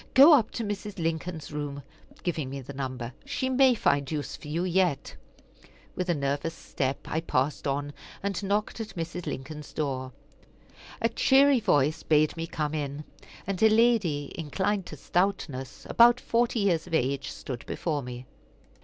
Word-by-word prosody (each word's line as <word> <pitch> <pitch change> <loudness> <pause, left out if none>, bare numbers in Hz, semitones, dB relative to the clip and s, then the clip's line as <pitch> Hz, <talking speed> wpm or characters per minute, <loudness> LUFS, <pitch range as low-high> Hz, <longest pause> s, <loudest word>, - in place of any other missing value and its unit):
"Go 280 +5 +10
up 240 -7 +4
to 235 - -3
Mrs. 205 -1 -4
Lincoln's 165 -2 -3
room" 145 -1 -4 0.4
giving 155 -6 -2
me 135 +1 -5
the 135 +2 -9
number 130 -3 -4
"she 260 - -2
may 260 -1 +5
find 140 -8 +1
use 150 -2 -3
for - - -11
you 165 +4 -1
yet." 180 -5 +1 0.8
With 180 0 -2
a 175 - +3
nervous 145 +3 -2
step 135 -3 -2
I 160 - -1
passed 140 -2 0
on, 145 +1 -2 0.3
and 200 -1 -1
knocked 205 +3 -1
at 215 -1 -7
Mrs. 170 0 -5
Lincoln's 150 +1 -6
door. 130 -4 -2 0.9
A 230 - +4
cheery 270 +3 +5
voice 155 -7 +2
bade 155 -1 +3
me 165 0 -4
come 155 -3 -2
in, 145 -1 -3 0.4
and 195 -1 -3
a 220 - +7
lady, 215 -11 +2
inclined 190 +5 -1
to 155 - -8
stoutness, 155 -7 -2
about 240 +1 +6
forty 235 -1 +1
years 175 -5 +1
of 165 - -1
age, 140 -1 0
stood 125 -3 -6
before 155 -4 -2
me. 125 0 -7
160 Hz, 160 wpm, -28 LUFS, 140-200 Hz, 0.9 s, Go